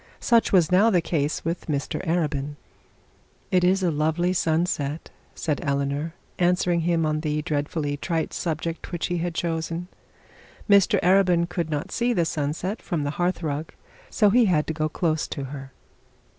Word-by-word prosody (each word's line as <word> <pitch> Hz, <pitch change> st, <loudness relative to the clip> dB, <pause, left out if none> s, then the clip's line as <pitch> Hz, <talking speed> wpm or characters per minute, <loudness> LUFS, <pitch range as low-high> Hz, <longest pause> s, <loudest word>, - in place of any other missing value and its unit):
Such 235 Hz, -1 st, +3 dB
was 180 Hz, -3 st, +4 dB
now 200 Hz, +5 st, +5 dB
the 185 Hz, -5 st, +3 dB
case 155 Hz, -3 st, -1 dB
with 170 Hz, +2 st, -3 dB
Mr 145 Hz, +3 st, -2 dB
Arabin. 150 Hz, -4 st, -1 dB, 1.0 s
'It 180 Hz, -1 st, +3 dB
is 190 Hz, +2 st, +3 dB
a 175 Hz, -, +2 dB
lovely 160 Hz, +4 st, +1 dB
sunset,' 160 Hz, -3 st, -1 dB, 0.2 s
said 150 Hz, -3 st, -1 dB
Eleanor, 140 Hz, +3 st, -1 dB, 0.2 s
answering 180 Hz, -1 st, +2 dB
him 165 Hz, -1 st, +1 dB
on 155 Hz, 0 st, 0 dB
the 150 Hz, -1 st, -1 dB
dreadfully 145 Hz, 0 st, -2 dB
trite 165 Hz, +1 st, -2 dB
subject 165 Hz, 0 st, -3 dB
which 175 Hz, -2 st, -2 dB
he 175 Hz, -1 st, -1 dB
had 170 Hz, 0 st, -3 dB
chosen. 165 Hz, +1 st, -2 dB, 0.8 s
Mr 200 Hz, -3 st, +5 dB
Arabin 180 Hz, -2 st, +4 dB
could 170 Hz, -2 st, -3 dB
not 150 Hz, -2 st, -3 dB
see 240 Hz, +1 st, +1 dB
the 170 Hz, -6 st, +1 dB
sunset 160 Hz, +7 st, -2 dB
from 165 Hz, -4 st, -2 dB
the 145 Hz, -, -1 dB
hearth 180 Hz, 0 st, 0 dB
rug, 150 Hz, +1 st, -3 dB, 0.4 s
as -, -, -9 dB
he 245 Hz, -1 st, +6 dB
had 160 Hz, -6 st, +2 dB
to 160 Hz, -, -3 dB
go 155 Hz, 0 st, -1 dB
close 155 Hz, -1 st, 0 dB
to 140 Hz, -, -5 dB
her. 135 Hz, 0 st, -8 dB
165 Hz, 165 wpm, -25 LUFS, 150-175 Hz, 1.0 s, he